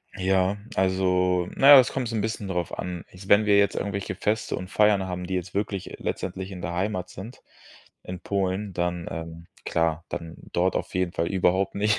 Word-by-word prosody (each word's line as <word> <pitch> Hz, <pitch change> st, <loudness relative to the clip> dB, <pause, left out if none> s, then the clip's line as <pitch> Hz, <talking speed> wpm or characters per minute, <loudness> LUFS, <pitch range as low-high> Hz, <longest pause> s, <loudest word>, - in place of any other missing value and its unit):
Ja, 95 Hz, +1 st, +1 dB, 0.2 s
also, 90 Hz, -1 st, +2 dB
na 135 Hz, -, +4 dB
ja, 140 Hz, -, +11 dB
es 125 Hz, -, +3 dB
kommt 130 Hz, -3 st, -2 dB
so 115 Hz, -, -4 dB
'n 110 Hz, -, 0 dB
bisschen 110 Hz, -1 st, -3 dB
drauf 90 Hz, -3 st, -3 dB
an. 90 Hz, -2 st, -5 dB
Ich 95 Hz, +2 st, -12 dB
wenn 105 Hz, +1 st, +6 dB
wir 100 Hz, -1 st, +5 dB
jetzt 100 Hz, -1 st, +3 dB
irgendwelche 100 Hz, -2 st, -3 dB
Feste 105 Hz, +3 st, -1 dB
und 90 Hz, -, -7 dB
Feiern 105 Hz, -2 st, +3 dB
haben, 90 Hz, -1 st, -4 dB
die 95 Hz, -, -2 dB
jetzt 90 Hz, -1 st, -4 dB
wirklich 100 Hz, -1 st, -3 dB
e -, -, -7 dB
letztendlich 95 Hz, +1 st, -4 dB
in 90 Hz, -2 st, -7 dB
der 85 Hz, -, -4 dB
Heimat 90 Hz, 0 st, -2 dB
sind 110 Hz, +7 st, -10 dB, 0.6 s
in 90 Hz, 0 st, -7 dB
Polen, 100 Hz, +1 st, -1 dB
dann 85 Hz, 0 st, -2 dB
ähm, 85 Hz, 0 st, -7 dB, 0.2 s
klar, 80 Hz, 0 st, 0 dB
dann 80 Hz, -1 st, -6 dB, 0.2 s
dort 90 Hz, +2 st, +1 dB
auf -, -, -5 dB
jeden 90 Hz, -1 st, 0 dB
Fall 85 Hz, -, -1 dB
überhaupt 95 Hz, +1 st, +1 dB
nicht. 105 Hz, +1 st, +2 dB
95 Hz, 205 wpm, -25 LUFS, 90-100 Hz, 0.6 s, ja